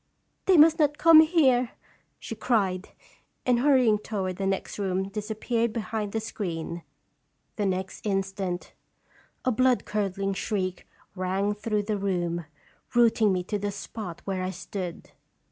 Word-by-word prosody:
"They 375 -2 +6
must 320 +2 +7
not 295 -1 +2
come 330 -1 +8
here!" 270 -7 +3 0.4
she - - -7
cried, 195 -5 0 0.6
and 245 -2 +3
hurrying 250 -6 +4
toward 190 -4 -3
the 195 - -1
next 195 +1 -2
room 190 -1 -1
disappeared 220 +3 -1
behind 220 -2 -3
the 220 - -1
screen. 170 -6 -4 0.7
The 205 -2 0
next 190 0 -3
instant 195 -3 -2 0.7
a 255 - +3
blood 255 +1 +2
curdling 195 -1 -1
shriek 185 -2 -3 0.3
rang 190 +2 0
through 210 0 -1
the 210 0 -2
room, 175 -4 -1 0.5
rooting 230 -3 +4
me 180 -1 0
to 205 +3 -3
the 205 +1 -2
spot 200 -3 -7
where 190 -2 -2
I 185 - -2
stood. 180 -1 -6
205 Hz, 140 wpm, -27 LUFS, 190-230 Hz, 0.7 s, come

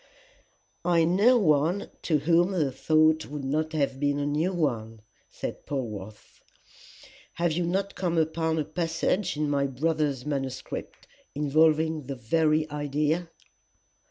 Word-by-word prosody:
"I 170 -1 +3
know 200 +9 +4
one 165 0 +2
to 155 - +1
whom 170 +5 +2
the 155 -7 +1
thought 155 +3 +2
would 145 -1 -6
not 155 +3 -1
have 140 -3 -1
been 145 0 +1
a 145 - -1
new 150 +5 0
one," 115 - -2 0.3
said - - -7
Polwarth. 110 -7 -6 0.9
"Have 170 -1 0
you 170 +2 -1
not 195 +3 -1
come 175 -3 -1
upon 160 0 0
a 155 - 0
passage 165 +3 -1
in 150 0 0
my 140 -1 +1
brother's 145 -1 -1
manuscript 135 -3 -5 0.3
involving 155 0 +2
the 140 - -4
very 155 +6 +1
idea?" 150 +3 -1
155 Hz, 130 wpm, -27 LUFS, 140-165 Hz, 0.9 s, know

